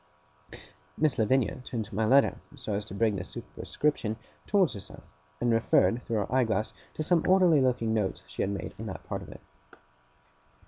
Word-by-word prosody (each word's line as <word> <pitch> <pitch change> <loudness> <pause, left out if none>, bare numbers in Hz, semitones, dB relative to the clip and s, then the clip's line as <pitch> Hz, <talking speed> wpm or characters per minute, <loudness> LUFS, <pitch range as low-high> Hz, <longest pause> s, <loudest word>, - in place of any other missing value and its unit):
Miss 155 -5 +1
Lavinia 130 +3 +2
turned 110 -4 -5
my 110 +3 +1
letter, 135 +5 +4 0.2
so 125 -6 -4
as 100 +1 -2
to 100 - -8
bring 110 -1 +2
the 90 - -3
superscription 115 -3 -2 0.3
towards 195 -5 +3
herself, 100 -1 -7 0.4
and 120 -1 +2
referred 115 +1 +3
through 115 - -3
her 105 +4 -2
eye 130 0 +4
glass 110 -1 -1 0.2
to 155 - -2
some 170 0 +3
orderly 180 -6 +5
looking 120 -3 +1
notes 105 -4 -1
she - - -5
had 95 - +1
made 100 -1 -4
on - - -5
that - - -7
part - - -4
of - - -10
it. - - -11
115 Hz, 180 wpm, -29 LUFS, 105-140 Hz, 0.4 s, orderly